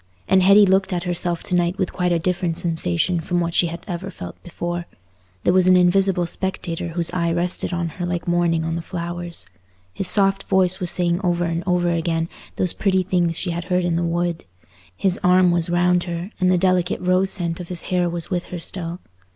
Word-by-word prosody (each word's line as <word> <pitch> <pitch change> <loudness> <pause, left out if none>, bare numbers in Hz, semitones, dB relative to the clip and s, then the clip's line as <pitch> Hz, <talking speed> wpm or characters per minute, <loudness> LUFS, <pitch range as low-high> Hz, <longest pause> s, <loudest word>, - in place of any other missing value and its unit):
And 190 0 +4
Hetty 200 +2 +7
looked 190 0 +2
at 175 -1 -2
herself 175 -1 -2
to 180 - -1
night 175 +1 +1
with 190 -3 -2
quite 180 -1 0
a 170 - +3
different 175 0 -1
sensation 165 - 0
from 175 +2 -1
what 170 -1 -1
she 175 - +3
had 170 +1 -7
ever 180 +1 -4
felt 90 - -8
before; 175 0 -5 0.6
there 175 - +3
was 185 -1 +4
an 185 0 +6
invisible 180 0 +3
spectator 175 -1 -4
whose 170 0 -2
eye 170 -2 0
rested 175 +2 -1
on 170 -1 -2
her 175 +3 -5
like 175 -1 -3
morning 170 -2 +1
on 165 - -2
the 170 - -2
flowers. 175 0 -4 0.5
His 185 - 0
soft 195 -1 +3
voice 185 -1 +2
was 180 - 0
saying 175 0 +1
over 175 -1 +1
and 170 +1 -2
over 175 -1 +2
again 165 0 -1 0.3
those 185 - +1
pretty 190 -2 +1
things 175 -2 0
she 180 - -1
had 170 0 -4
heard 180 -1 +1
in 175 -1 0
the 170 - 0
wood; 170 0 -1 0.5
his 190 - +1
arm 180 0 +5
was 170 -1 +1
round 175 0 +2
her, 175 +3 -5
and 185 -1 +3
the 180 - +3
delicate 185 -1 +1
rose 185 +1 +2
scent 170 -3 -3
of 175 - -7
his 175 -1 -4
hair 180 -1 +2
was 170 +1 -5
with 180 -1 -1
her 180 - -6
still. 170 0 -2
175 Hz, 215 wpm, -21 LUFS, 170-185 Hz, 0.6 s, Hetty